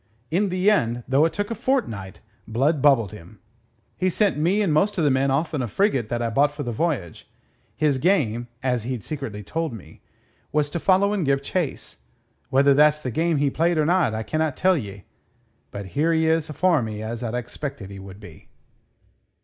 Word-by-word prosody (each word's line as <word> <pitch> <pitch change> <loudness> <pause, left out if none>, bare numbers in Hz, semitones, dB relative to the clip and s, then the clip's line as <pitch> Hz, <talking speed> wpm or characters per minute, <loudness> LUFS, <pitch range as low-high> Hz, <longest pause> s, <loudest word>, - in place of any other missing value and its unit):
In 195 +4 +1
the 185 +3 +3
end, 120 - 0
though 135 +4 +4
it 165 - -1
took 205 +2 -3
a - - +1
fortnight, 155 - -2 0.3
Blood 135 +7 +1
bubbled 130 -9 +4
him. 105 0 -13 0.6
He 185 - 0
sent 205 +3 +1
me 180 +8 +1
and 170 -6 +1
most 195 +8 +2
o' 170 - +1
the 145 - +3
men 135 +1 +2
off 145 +5 0
in 145 - -1
a 120 - -2
frigate 135 - 0
that 120 0 -1
I 115 - -1
bought 145 +5 +3
for 145 0 -6
the 120 - -3
voyage. 120 - -3 0.5
His 145 -4 +1
game 125 - +1 0.2
as 125 -2 0
he'd 120 -1 -4
secretly 125 -9 -6
told 160 - -3
me 110 - -12 0.5
was 145 -1 0
to 170 - -2
follow 195 +3 +3
and 200 -4 0
give 140 -1 +1
chase. 170 -2 -3 0.5
Whether 140 +1 +4
that's 150 +2 +4
the 130 -4 -4
game 165 +5 +1
he 140 -1 +1
played 170 +3 +1
or 155 - +2
not 170 -9 +2
I 110 - -3
can't 155 +2 -1
tell 185 +1 +3
ye; 100 - -6 0.7
but 100 0 -7
here 155 +4 +2
he 160 0 +2
is 160 -1 +1
afore 165 0 +2
me 110 -1 -5
as 115 +1 -5
I'd 120 -1 -3
expected 125 -3 -6
he 100 - -8
would 95 0 -11
be." 90 -7 -14
145 Hz, 205 wpm, -23 LUFS, 115-165 Hz, 0.7 s, though